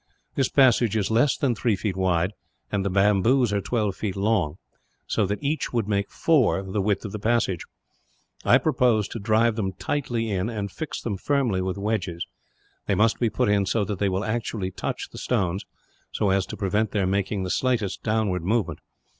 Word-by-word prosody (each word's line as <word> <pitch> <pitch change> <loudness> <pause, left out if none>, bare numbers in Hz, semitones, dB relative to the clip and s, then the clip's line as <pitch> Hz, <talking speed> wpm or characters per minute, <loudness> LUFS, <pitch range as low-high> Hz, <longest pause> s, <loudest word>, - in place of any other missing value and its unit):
This 135 - +1
passage 120 -5 +4
is 105 0 0
less 120 +5 +3
than 140 -5 +1
three 115 -1 +1
feet 100 -1 -3
wide, 90 -1 +1 0.4
and 100 -2 0
the 100 - 0
bamboos 105 +5 +3
are 100 - +1
twelve 105 -3 -1
feet 100 -4 -3
long; 100 -6 +1 0.5
so 105 -3 0
that 105 +7 -3
each 150 +3 -1
would 115 -4 0
make 100 -1 0
four, 130 -11 +2
the 95 +2 -2
width 105 +2 0
of 105 - -5
the 105 - -5
passage. 110 -5 0 0.8
I - - +6
propose 115 -5 +2
to 115 - -5
drive 110 +2 +2
them 95 -3 -1
tightly 115 0 -2
in, 95 +2 -1
and 105 -4 -4
fix 155 - -5
them 105 -5 -2
firmly 125 -6 +1
with 95 +1 -2
wedges. 100 -5 -2 0.6
They - - +2
must 110 +1 +2
be 120 - +2
put 105 - 0
in 100 -1 +2
so 105 0 +1
that 100 -1 -4
they 100 - +2
will 95 +2 -1
actually 110 -4 -2
touch 95 - -4
the - - -8
stones, 95 0 -1 0.4
so 100 -3 +1
as 95 -1 +1
to - - -7
prevent 105 +2 0
their 100 -3 +1
making 95 +1 0
the 90 - -2
slightest 120 -7 0
downward 105 -5 0
movement. 105 +1 0
105 Hz, 195 wpm, -25 LUFS, 95-115 Hz, 0.8 s, I